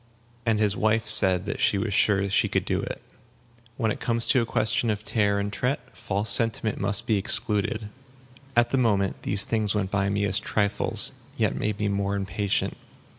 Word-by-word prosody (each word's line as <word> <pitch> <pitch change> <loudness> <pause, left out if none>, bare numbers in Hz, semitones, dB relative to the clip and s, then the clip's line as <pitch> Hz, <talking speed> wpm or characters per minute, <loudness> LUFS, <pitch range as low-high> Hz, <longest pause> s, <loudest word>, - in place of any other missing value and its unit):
And 110 -1 +2
his 105 -2 +1
wife 110 +1 +1
said 95 -4 +5
that - - -4
she 100 - +3
was 100 +1 -2
sure 100 0 +2
she 100 - +1
could - - -1
do - - -1
it. - - -7 0.7
When 110 -3 0
it - - -5
comes 115 -1 +1
to 130 - +4
a 115 - -3
question 115 +1 0
of 105 -1 -2
tare 105 -2 0
and 100 0 -4
tret, 125 +5 -1 0.2
false 100 +1 -2
sentiment 115 -2 +1
must 100 +1 -1
be 110 - +1
excluded. 105 +2 +1 0.7
At 120 0 +3
the 135 - +1
moment, 100 -5 0
these 100 -1 +1
things 110 -2 -1
went 100 -2 -2
by 100 -1 0
me 100 0 -1
as 100 0 0
trifles, 100 0 +1 0.3
yet - - 0
made 105 -1 -2
me 105 - 0
more 100 0 -1
impatient. 100 0 -2
105 Hz, 190 wpm, -25 LUFS, 100-110 Hz, 0.7 s, said